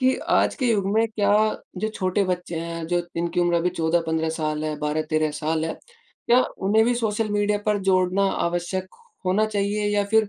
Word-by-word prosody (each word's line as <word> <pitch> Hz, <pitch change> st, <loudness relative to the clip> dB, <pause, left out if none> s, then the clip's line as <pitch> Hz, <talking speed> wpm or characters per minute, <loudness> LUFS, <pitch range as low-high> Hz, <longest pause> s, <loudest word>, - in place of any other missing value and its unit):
कि 260 Hz, 0 st, +3 dB, 0.2 s
आज -, -, +3 dB
के 260 Hz, -, -1 dB
युग 200 Hz, -3 st, +1 dB
में 225 Hz, +1 st, +3 dB
क्या 205 Hz, -2 st, 0 dB, 0.5 s
जो 215 Hz, -, -1 dB
छोटे 185 Hz, +2 st, 0 dB
बच्चे 180 Hz, -2 st, -3 dB
हैं 165 Hz, -1 st, -5 dB
जो 175 Hz, 0 st, 0 dB
इनकी 170 Hz, +1 st, 0 dB
उम्र 175 Hz, 0 st, +2 dB
अभी 175 Hz, +2 st, +1 dB
14-15 160 Hz, -1 st, 0 dB
साल 155 Hz, -1 st, -2 dB
है 155 Hz, -1 st, -2 dB
12-13 155 Hz, +1 st, 0 dB
साल 160 Hz, +1 st, 0 dB
है। 160 Hz, -, -3 dB, 0.5 s
क्या 250 Hz, +2 st, +5 dB, 0.2 s
उन्हें 220 Hz, +2 st, +4 dB
भी 245 Hz, +1 st, +2 dB
सोशल 220 Hz, -2 st, -1 dB
मीडिया 205 Hz, 0 st, +1 dB
पर 210 Hz, -1 st, +2 dB
जोड़ना 185 Hz, +1 st, +3 dB, 0.2 s
आवश्यक 175 Hz, +2 st, -2 dB, 0.4 s
होना 205 Hz, +4 st, +3 dB
चाहिए 205 Hz, 0 st, -1 dB
या 205 Hz, -, +2 dB
फिर 220 Hz, -2 st, +4 dB
185 Hz, 185 wpm, -24 LUFS, 165-210 Hz, 0.5 s, क्या